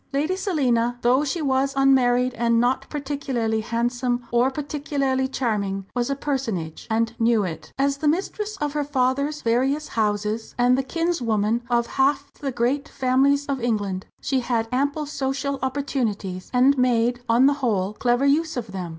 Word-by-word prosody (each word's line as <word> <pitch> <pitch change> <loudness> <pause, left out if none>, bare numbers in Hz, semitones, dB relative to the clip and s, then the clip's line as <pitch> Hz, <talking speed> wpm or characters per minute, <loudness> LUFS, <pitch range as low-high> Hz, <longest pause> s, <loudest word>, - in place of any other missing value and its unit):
Lady 305 +7 0
Selina, 250 - 0
though 255 +4 +4
she 305 +3 -2
was 270 0 +1
unmarried, 255 -2 +3
and 235 -1 +2
not 245 +2 0
particularly 270 -6 -2
handsome 240 +1 -1
or 240 +2 +3
particularly 275 -2 -1
charming, 205 -7 -2
was 245 +1 0
a 275 - 0
personage 230 - -3
and 225 +1 0
knew 225 -2 +3
it. 170 -4 -6
As 275 +1 +1
the 300 - -1
mistress 405 +6 -1
of 295 -5 -2
her 295 -1 0
father's 280 +2 0
various 265 +6 +1
fine 225 - +1
houses, 210 +1 -2
and 245 +1 +4
the 265 - +1
kinswoman 240 -8 0
of 235 -1 +2
half 275 +3 0
the 275 -2 -4
great 245 +4 -1
families 275 +2 +2
of 275 -3 -2
England, 205 -5 -1
she 270 -2 0
had 235 -2 -1
ample 285 +4 0
social 280 0 -2
opportunities, 235 -9 -2
and 260 +2 +4
made, 245 -1 +2
on 235 +3 +5
the 285 - +5
whole, 205 -5 0
clever 245 +4 +1
use 310 +1 +2
of 230 -4 -4
them. 185 -3 -5
255 Hz, 165 wpm, -23 LUFS, 230-280 Hz, -, on